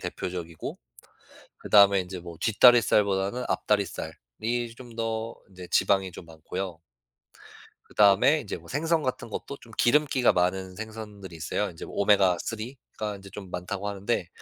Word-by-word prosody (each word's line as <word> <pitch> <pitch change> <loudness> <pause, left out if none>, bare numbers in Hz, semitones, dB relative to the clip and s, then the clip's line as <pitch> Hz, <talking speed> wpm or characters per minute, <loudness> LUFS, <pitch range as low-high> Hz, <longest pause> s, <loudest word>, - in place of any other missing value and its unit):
대표적이고 85 -3 -5 0.8
그다음에 100 -2 +5
이제 90 0 -7
뭐 85 -1 -10
뒷다리살보다는 110 -2 +4
앞다리살이 100 -3 -1 0.6
좀 120 -3 -12
더 115 0 -2 0.2
이제 90 -1 -10
지방이 95 0 +2
좀 85 - -10
많고요. 85 +2 -6 1.1
그다음에 105 +9 +4
이제 105 - -5
뭐 - - -16
생선 160 +3 0
같은 130 -2 -3
것도 140 +6 -6
좀 115 - -16
기름기가 130 -1 +4
많은 90 +1 0
생선들이 105 -4 -8
있어요. 90 +6 -2
이제 80 - -9
오메가3가 105 +3 0
이제 100 0 -12
좀 95 -1 -9
많다고 90 +3 -4
하는데 100 -1 -2
100 Hz, 320 characters per minute, -27 LUFS, 90-115 Hz, 1.1 s, 그다음에